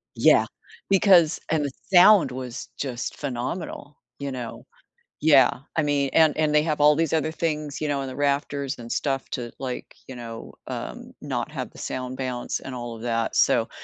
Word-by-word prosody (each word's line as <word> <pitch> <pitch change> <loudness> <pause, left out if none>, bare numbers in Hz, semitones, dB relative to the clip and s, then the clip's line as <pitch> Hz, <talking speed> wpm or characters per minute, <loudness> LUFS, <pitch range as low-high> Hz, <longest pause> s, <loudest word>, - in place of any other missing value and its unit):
Yeah, - - +5 0.4
because 185 -5 +5
and 155 -1 +1
the 140 - -3 0.2
sound 185 +1 +7
was 125 -2 -6
just 125 -4 -4
phenomenal, 145 +2 -5 0.2
you 140 -1 -4
know, 125 -3 -7 0.6
yeah, 140 -5 +5 0.2
I 155 - +2
mean, 145 -2 +1
and 160 -2 +5
and 155 -1 +2
they 150 0 +4
have 155 -2 -1
all 150 0 +6
these 165 0 0
other 155 0 +1
things, 155 -3 -3
you 155 - -2
know, 140 -1 0
in 135 - -4
the 130 - -7
rafters 140 -1 -1
and 115 -1 -9
stuff 135 -2 -1
to, 120 -2 -4
like, 130 -2 -6
you 130 - -8
know, 115 -2 -8
um, - - -6
not - - -3
have - - -5
the - - -17
sound 130 0 -5
bounce 125 -2 -3
and 130 - -8
all 120 -1 -6
of 110 - -11
that, 115 -2 -1
so - - +3
140 Hz, 185 wpm, -25 LUFS, 125-155 Hz, 0.6 s, sound